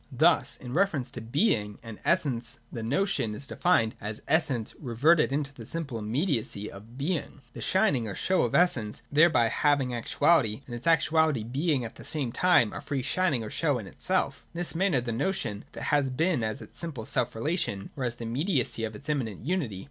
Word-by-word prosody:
Thus - - +3
in 125 -1 -8
reference 160 -8 +1
to 120 - -7
Being 115 - +1
and 115 -2 -9
Essence 125 -9 0
the 115 - -5
Notion 120 - 0
is 140 - -7
defined 140 -7 +2
as 105 0 -5
Essence 140 -7 +1
reverted 150 +6 +3
to 140 0 -1
the 120 - -9
simple 140 -2 -3
immediacy 110 - -1
of 110 +5 -12
Being, 150 0 -2
— - - -33
the - - -8
shining 185 - +2
or 100 - -5
show 185 0 +1
of - - 0
Essence 115 -12 +2
thereby 150 -5 +5
hav 145 +4 +3
ing 125 -2 -2
actuality, 125 -1 +2
and 120 - -9
its 120 +6 -5
actuality 160 -5 +3
being 135 +2 0
at 115 - -9
the - - -10
same 140 -6 -2
time 175 -8 +4
a - - -5
free 140 -3 -3
shining 140 -3 +1
or 110 - -6
show - - +1
in - - -6
itself - - -1
In - - -6
this 175 0 -1
manner 170 -6 +2
the 120 -1 -3
notion 115 - -2
has 145 -2 +1
being 160 +2 +1
as 110 0 -3
its - - -10
simple 155 -9 -4
selfrelation, 120 - -1
or 135 - -4
as 120 -1 -1
the 120 - -8
immediacy 125 - 0
of 110 -1 -3
its 140 +6 -9
immanent 125 -8 -2
unity. 145 - -1
130 Hz, 195 wpm, -28 LUFS, 115-160 Hz, -, thereby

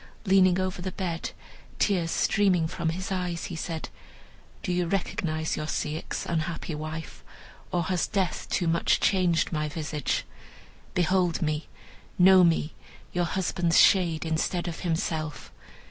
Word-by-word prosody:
Leaning 190 -2 +5
over 185 -1 -2
the 185 +1 -3
bed, 170 -4 -3 0.5
tears 180 -5 +1
streaming 185 -3 +2
from 165 0 -2
his 185 +4 -4
eyes, 180 -3 -2
he 175 - -5
said, 160 0 -4 0.7
"Do - - -1
you 175 -1 0
recognize 160 -4 -1
your 155 - -4
Ceyx, 155 0 -3
unhappy 165 0 -2
wife, 155 +1 -6 0.5
or 175 -1 +1
has 180 +1 0
death 190 -3 -1
too 175 - 0
much 165 +1 +2
changed 180 -4 +2
my 155 -2 -1
visage? 150 -3 -2 0.7
Behold 180 -1 +2
me, 155 0 -1 0.5
know 185 0 +7
me, 165 -2 +2 0.4
your 175 0 +1
husband's 175 -2 +1
shade, 170 -4 +4
instead 165 +2 -1
of 170 - -5
himself. 160 -3 -2
170 Hz, 135 wpm, -27 LUFS, 160-185 Hz, 0.7 s, know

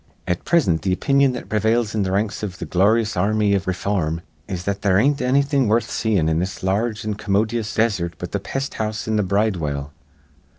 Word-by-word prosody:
At 90 -1 -2
prisint 115 - +2
th' - - -5
opinion 135 +8 +3
that 125 - -6
pre 105 - 0
vails 110 +1 +1
in 105 -2 +1
th' - - -1
ranks 100 +2 -1
iv 95 -4 -5
th' - - -6
gloryous 105 +4 +2
ar 100 +4 +1
rmy 105 -1 +2
iv 95 -1 0
ray 95 - +1
form 85 -4 -1 0.3
is 90 -3 -4
that 100 +1 -2
there 95 -3 +3
ain't 140 +7 +2
anny 130 +3 +3
thing 140 -3 +1
worth 110 +2 +2
seein' 100 -8 +1
in 80 0 +1
this 90 +2 -4
lar 100 +5 +1
rge 110 0 -8
an' 110 - -1
commodyous 105 +2 -1
desert 100 -7 0
but - - -6
th' - - -2
pest 135 +1 -4
house 110 0 -3
an' 110 -1 +1
the - - +3
bridewell. 90 -8 -1
105 Hz, 225 wpm, -21 LUFS, 95-115 Hz, 0.3 s, opinion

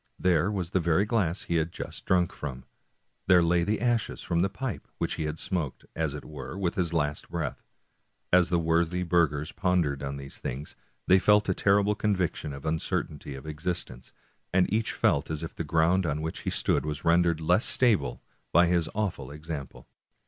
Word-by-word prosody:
There 90 +1 +2
was 95 -4 -3
the 95 - +2
very 85 +3 +2
glass 100 -6 0
he 85 - 0
had 80 +1 0
just - - -7
drunk 90 -2 +2
from; 65 -3 -6 0.6
there 90 -2 +6
lay 85 +1 +3
the 105 +4 0
ashes 120 -1 0
from 85 -1 0
the 95 +3 +2
pipe 115 +3 -5
which - - -1
he 80 - -3
had 75 +1 -3
smoked, 80 -9 -3
as 80 -3 -1
it 75 - -8
were, 70 +1 -7
with 90 -3 0
his 85 -3 -1
last 75 -3 -1
breath. - - -3 0.7
As 90 -1 +5
the 90 - +2
worthy 85 +2 +1
burghers 80 -4 +1
pon 90 -1 +2
dered 70 -2 -3
on 70 0 -4
these 70 0 -9
things, 70 +4 -5 0.3
they 95 +1 +6
felt 105 +1 +4
a - - +4
terrible 100 +2 +3
conviction 95 -7 -1
of 70 0 -8
the 80 - 0
vincertainty 75 -3 -3
of 65 - -10
existence, 75 -5 -4 0.4
and 90 +1 +3
each 110 +1 +1
felt 70 - +1
as 80 0 -3
if 80 - -6
the - - -4
ground 85 +4 +2
on 75 +1 -2
which 80 - -3
he - - -3
stood - - +1
was 75 0 -4
rendered 85 -1 +3
less 90 +7 +3
stable 105 - +2 0.3
by 85 +2 +6
his 85 -2 +1
awful 100 -10 -2
ex 75 +3 -9
ample. 70 -4 -7
85 Hz, 200 wpm, -28 LUFS, 75-95 Hz, 0.7 s, there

